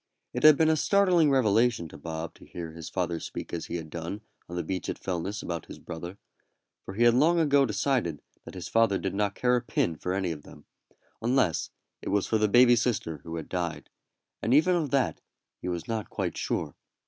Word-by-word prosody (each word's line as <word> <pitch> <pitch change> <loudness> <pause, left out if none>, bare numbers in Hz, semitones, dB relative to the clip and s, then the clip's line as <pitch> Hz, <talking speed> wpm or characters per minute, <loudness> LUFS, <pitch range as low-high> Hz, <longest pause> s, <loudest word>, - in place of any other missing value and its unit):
It - - -2
had 155 -2 +8
been 160 0 +4
a - - +3
startling 180 -2 +4
revelation 115 -7 +3
to - - -12
Bob 80 +1 -5
to - - -16
hear 85 -2 -7
his 80 -1 -8
father 85 -3 -2
speak - - -7
as 85 - -3
he - - -4
had 80 -2 -6
done 85 +6 -5 0.3
on 85 - -6
the 90 - -1
beach 90 -4 -3
at - - -4
Fellness 95 +3 -3
about 85 -3 -4
his - - -9
brother, 85 +3 -8 0.7
for 95 - -8
he 115 - +2
had 120 -1 +6
long 160 +7 +4
ago 140 -4 +4
decided 105 - 0 0.2
that - - -11
his 90 - -6
father 115 -3 +3
did 95 - -3
not 100 0 0
care 125 0 +2
a 120 - +1
pin 85 -7 0
for 90 +4 -3
any 95 -3 -1
of 75 -2 -6
them, - - -15 0.6
unless 120 - +1 0.3
it - - -5
was 100 -1 +1
for 110 - +1
the 105 - +3
baby 120 +3 +6
sister 110 - -1
who 80 +3 -7
had 80 -2 -5
died, 90 -3 -4 0.5
and 115 +4 +2
even 180 +5 +5
of 160 -5 0
that 135 0 0 0.4
he - - -5
was 85 -2 -3
not 110 -2 -3
quite - - -3
sure. - - -2
100 Hz, 220 wpm, -28 LUFS, 85-125 Hz, 0.7 s, had